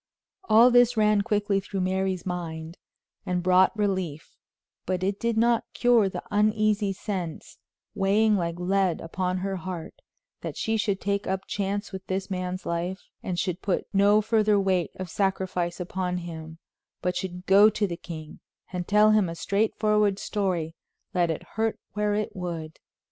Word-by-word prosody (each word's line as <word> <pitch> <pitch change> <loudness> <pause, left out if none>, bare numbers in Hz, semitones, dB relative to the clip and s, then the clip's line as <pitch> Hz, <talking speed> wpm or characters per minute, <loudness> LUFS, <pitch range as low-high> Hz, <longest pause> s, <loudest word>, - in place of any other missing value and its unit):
All 235 -3 +6
this 245 -1 +5
ran 210 -1 +4
quickly 205 -1 +1
through 195 0 -4
Mary's 185 -1 -1
mind, 165 -2 -5 0.4
and 180 -1 -1
brought 185 +3 +4
relief; 185 -7 -2 0.5
but 185 0 -1
it 195 +1 -1
did 230 -1 0
not 235 0 +3
cure 240 -5 +4
the - - -6
uneasy 210 -1 +2
sense, 185 -4 -5 0.3
weighing 210 +2 +3
like 170 -3 -1
lead 185 -1 +1
upon 180 +2 -2
her 195 +1 -2
heart, 180 -2 -6 0.5
that - - -5
she 225 - 0
should 205 -3 0
take 200 0 -1
up 190 0 -1
chance 205 +1 -2
with 190 -1 -7
this 190 +1 -3
man's 185 0 -3
life, 175 +3 -3
and 180 -2 -3
should 180 -1 -2
put 195 - -1
no 205 +2 +5
further 215 -2 +3
weight 190 -3 +1
of 185 - -5
sacrifice 185 -1 -1
upon 180 0 -2
him, 160 -2 -7 0.5
but 180 0 0
should 180 0 -5
go 200 +3 +7
to 215 0 0
the 175 -3 -3
king 160 -3 -9 0.3
and 180 -1 -3
tell 210 +1 +5
him 210 -5 +3
a 165 - -5
straightforward 210 +1 +1
story, 185 -7 -2 0.4
let 175 -2 +2
it 160 - -3
hurt 225 0 -2
where 210 0 0
it 210 0 -2
would. 170 -4 -5
190 Hz, 160 wpm, -26 LUFS, 180-210 Hz, 0.5 s, go